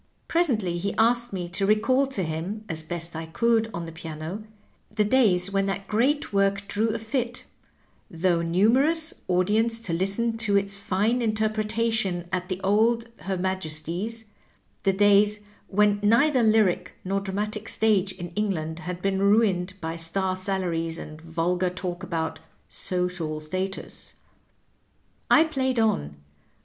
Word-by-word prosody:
Presently 220 - +1
he 200 +3 -2
asked 235 +2 +3
me 180 -3 -4
to 195 +3 0
recall 255 +6 +3
to 265 -8 -3
him, 175 +7 -4
as 160 -3 -3
best 165 +1 -4
I 160 0 -5
could 225 +5 +1
on 170 -4 -5
the 165 - -7
piano, 160 +4 -6 0.5
the 215 0 +1
days 200 -6 +3
when 195 0 +1
that 195 0 -3
great 255 +5 +1
work 195 0 +1
drew 210 +3 0
a - - 0
fit, 240 +2 -3 0.6
though 170 0 +1
numerous, 255 - +2
audience 210 +6 +2
to 180 -7 -3
listen 200 +6 0
to 205 -3 +2
its 200 0 +1
fine 200 +5 0
interpretation 215 -4 0
at 180 0 -2
the 185 -1 -2
old 230 +4 +2
Her 190 -1 -3
Majesty's 185 +4 -3 0.3
— - - -40
^the 195 -1 +2
days 205 +1 +4 0.3
when 205 +1 +3
neither 245 +6 +4
lyric 210 -5 +2
nor 195 +1 0
dramatic 210 +2 -3
stage 205 -3 +3
in 175 -2 -7
England 170 -4 -2
had 180 +2 -6
been 195 -1 +1
ruined 200 -3 +2
by 165 0 -4
star 185 +3 -1
salaries 180 -4 -2
and 155 -1 -9
vulgar 170 +2 0
talk 180 -1 -5
about 160 -2 -3 0.3
"social 180 -4 -1
status." 185 +5 -5 1.1
I 315 - +7
played 265 -5 -1
on. 75 - 0
195 Hz, 145 wpm, -25 LUFS, 175-220 Hz, 1.1 s, I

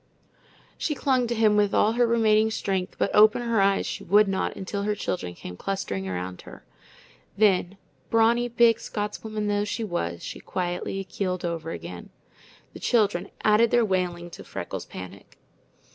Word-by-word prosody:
She 300 - -1
clung 260 -4 +1
to 235 - -1
him 215 -2 +4
with 205 -1 +2
all 215 - +4
her 240 +1 +2
remaining 220 -2 +3
strength, 190 -4 -2
but - - 0
open 215 +3 +6
her 230 -3 +2
eyes 195 0 +2
she - - -5
would 205 +3 +4
not 195 -1 -1
until 200 +1 -4
her 210 +1 0
children 90 - -4
came 90 - -8
clustering 100 - -3
around 90 0 -5
her. - - -13 0.7
Then, 195 -2 +2 0.3
brawny, 230 +2 +3
big 235 -1 +4
Scotswoman 210 0 -4
though 205 0 +1
she 210 +2 -3
was, 85 - -3
she - - -6
quietly 180 +2 -3
keeled 185 -1 -3
over 165 -1 -3
again. - - -7 0.6
The - - -10
children 205 -6 +1
added 215 +2 +5
their 240 0 +3
wailing 175 -3 -2
to - - -10
Freckles' - - -6
panic. 90 -1 -10
205 Hz, 160 wpm, -26 LUFS, 180-225 Hz, 0.7 s, open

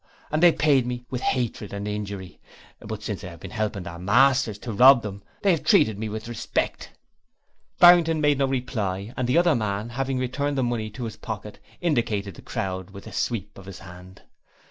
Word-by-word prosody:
And 155 +1 0
they 175 -1 +8
paid 140 -6 +2
me 125 0 -5
with 125 -1 -3
hatred 120 -5 -2
and 100 0 -4
injury. 100 -3 -5 0.4
But 110 0 -7
since 105 -2 -4
I - - -6
have 85 -2 -11
been - - -9
helping 105 -4 -2
their 85 0 -8
masters 120 +3 +3
to 115 +1 -6
rob 125 +3 +7
them, 100 -1 -6 0.2
they 200 - +5
have 165 - 0
treated 110 - +3
me 110 0 -3
with 110 +2 -6
respect.' 120 - -3 0.9
Barrington 175 -2 +7
made 145 -2 +2
no 135 - +2
reply 115 -6 -3
and 125 - -1
the 125 - +3
other 170 -1 +4
man, 105 -2 -2
having 135 +2 -2
returned 140 +3 -2
the 130 - +1
money 120 -3 -2
to 120 +4 -8
his 115 -2 -6
pocket, 105 -2 -7 0.2
indicated 115 - 0
the - - -13
crowd 95 -1 -4
with 100 0 -11
a - - -10
sweep 105 -3 -3
of 95 - -13
his 100 -1 -8
hand. 95 0 -13
115 Hz, 200 wpm, -25 LUFS, 100-135 Hz, 0.9 s, they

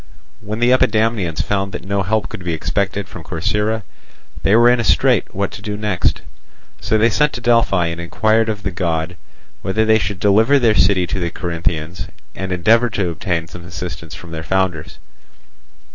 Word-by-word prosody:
When 105 +2 -5
the 120 +2 +3
Epidamnians 110 -9 +2
found 100 -1 -2
that - - -6
no 100 0 0
help 105 0 0
could 90 - -8
be 85 -1 -2
expected 100 +4 -2
from 90 - -10
Corcyra, 105 +7 -1 0.6
they 100 - +3
were 120 +1 +6
in 120 0 +4
a - - 0
strait - - +3
what - - -1
to - - -9
do 105 -1 -4
next. 105 -4 0 0.6
So 110 - +1
they 115 +2 +3
sent 150 +5 +2
to - - -4
Delphi 115 -7 +3
and 85 0 -3
inquired 110 +6 +1
of 105 -1 -3
the 95 - -2
God 85 -1 -2 0.5
whether 110 +3 0
they 110 0 +4
should 100 -2 -3
deliver 110 +8 +4
their 120 -5 +3
city 95 -2 +3
to 90 - -3
the 85 -1 -1
Corinthians 85 -1 -3 0.3
and 95 0 -5
endeavour 115 +7 +3
to 95 -5 -1
obtain 85 0 -2
some 85 +1 -10
assistance 85 -2 -7
from 85 - -11
their 80 -1 -5
founders. 95 -2 -1
95 Hz, 185 wpm, -18 LUFS, 85-110 Hz, 0.6 s, were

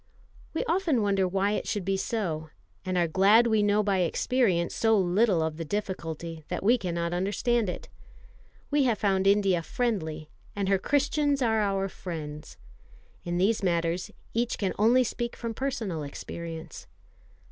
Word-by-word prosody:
We - - 0
often 330 - +1
wonder 195 -2 +2
why 195 +2 +1
it 210 - -2
should 205 -4 -2
be 195 0 +1
so, 175 -7 -2 0.3
and 185 -1 -2
are 175 -1 +3
glad 200 +8 +5
we 220 -2 +3
know 205 +1 +3
by 195 -2 +1
experience 180 0 +1
so 225 -1 +3
little 190 -1 +2
of 160 -1 -3
the 165 - -3
difficulty, 165 -3 -4
that 180 - -4
we 235 +5 +4
cannot 170 -3 -2
understand 205 +4 0
it. - - -6 0.8
We 290 -1 +3
have 235 -4 +2
found 195 -1 +1
India 195 -3 +3
friendly, 160 -8 -2 0.2
and 200 -1 -1
her 195 -1 +3
Christians 285 +2 +1
are 220 -2 +2
our 195 -1 0
friends. 155 -5 -7 0.7
In 175 0 -1
these 205 +5 +2
matters 170 -1 0 0.2
each 235 +1 0
can 195 -3 -1
only 240 +4 +5
speak 240 0 -3
from 230 -1 -4
personal 220 - -3
experience. 165 +3 -7
195 Hz, 160 wpm, -27 LUFS, 170-225 Hz, 0.8 s, glad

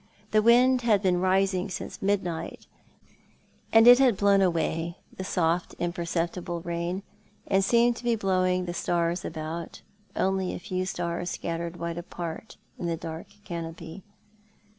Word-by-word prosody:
The 215 - +4
wind 245 +3 +5
had 215 -4 +2
been 180 -2 +2
rising 190 0 +1
since 185 - -6
midnight, 190 -4 -2 1.1
and 225 0 +7
it 245 +1 +10
had 250 -7 +4
blown 200 0 +4
away 170 -1 0 0.2
the 190 - -5
soft 175 -2 0
imperceptible 170 0 -2
rain, 170 +2 -3 0.4
and 195 0 +2
seemed 235 +3 +3
to - - -10
be 240 -1 +2
blowing 185 -3 +1
the 175 - -4
stars 170 0 0
about— 160 +1 -6 0.3
only 190 -1 0
a - - -6
few 185 0 -3
stars 175 -1 -3
scattered 170 +1 -4
wide 170 0 -4
apart 175 +2 -7 0.2
in 175 - -3
the 165 -1 -1
dark 160 0 -7 0.2
canopy. 165 -1 -7
180 Hz, 140 wpm, -27 LUFS, 170-195 Hz, 1.1 s, it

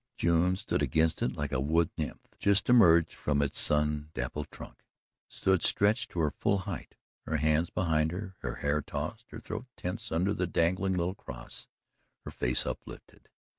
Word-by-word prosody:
June 85 +2 +3
stood 95 -6 -2
against 80 +4 +1
it - - 0
like 75 -1 -3
a 65 - 0
wood 80 +4 +2
nymph 75 - -5
just 100 +2 +2
emerged 85 -9 +6
from 75 -1 -1
its 70 -1 +1
sun 75 0 +2
dappled 70 +4 -4
trunk - - -12 0.5
stood 95 -2 +1
stretched 110 +5 +2
to 85 - -5
her 75 -2 +2
full 100 - +1
height, 95 - -6 0.3
her 80 - 0
hands 80 +2 +2
behind 80 -3 +1
her, 95 +1 -6
her - - -4
hair 75 +1 0
tossed, 75 - -5
her 115 - -8
throat 110 +3 -6
tense 110 +6 -5
under 90 +5 +1
the 90 -2 -1
dangling 90 +3 +1
little 90 +1 0
cross, - - -10 0.6
her - - -6
face 60 0 0
uplifted. - - -8
85 Hz, 170 wpm, -30 LUFS, 75-95 Hz, 0.6 s, emerged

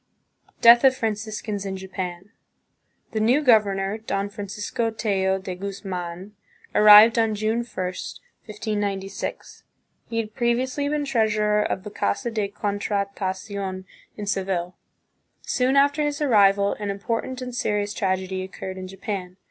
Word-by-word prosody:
Death 235 +1 +8
of 260 -1 +5
Franciscans 215 -3 -3
in 190 -1 -4
Japan. 185 0 -6 0.8
The 220 - -1
new 245 +8 +3
governor, 205 -4 +3
Don 200 -2 -2
Francisco 205 +3 -3
Tello 195 -4 0
de 190 -1 -6
Guzman, 185 -1 -6 0.4
arrived 215 +2 +8
on 225 -1 +2
June 215 +2 0
1, 240 - -3
1596. 205 - -5 0.5
He 230 - -3
had 215 -1 -2
previously 255 +5 0
been 295 0 -1
treasurer 215 -4 +2
of 190 -2 -2
the 210 - -8
Casa 205 - -1
de 215 -3 -1
Contrata 200 -1 -2
cion 190 -2 -6 0.3
in 210 - -5
Seville. 185 -3 -2 0.7
Soon 255 +2 +1
after 285 +2 +4
his 295 -1 -1
arrival 200 -7 +4
an 205 -1 -3
important 230 +5 -3
and 250 -1 -6
serious 210 -3 -1
tragedy 190 -2 -1
occurred 190 0 -7
in 185 - -6
Japan. 190 -1 -6
205 Hz, 130 wpm, -24 LUFS, 195-225 Hz, 0.8 s, Death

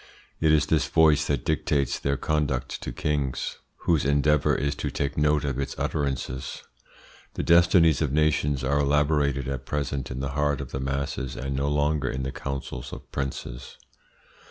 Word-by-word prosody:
It 80 -1 +3
is 75 -2 +4
this - - +1
voice 75 -2 +4
that 70 -4 -1
dictates 70 -3 0
their 70 0 0
conduct 70 -5 -1
to - - -4
kings, 70 +1 -2 0.2
whose 80 -4 +2
endeavour 70 +1 +3
is 70 +1 0
to - - -2
take 70 0 -2
note 75 -1 +2
of 70 -2 -2
its 70 0 -3
utterances. 65 -3 -3 0.7
The - - -2
destinies 85 -3 +5
of 75 -4 +1
nations 75 -2 +1
are 70 +2 +2
elaborated 70 -2 +2
at 65 -1 -4
present 70 -2 -2
in 65 - -5
the 70 0 -2
heart 75 +1 0
of 70 -3 -6
the 65 - -3
masses, 70 -1 -3
and 70 0 -3
no 70 +1 0
longer 75 -2 +1
in 65 +1 -3
the 65 - -3
councils 70 0 -5
of - - -10
princes. 65 -2 -5
70 Hz, 170 wpm, -26 LUFS, 65-75 Hz, 0.7 s, destinies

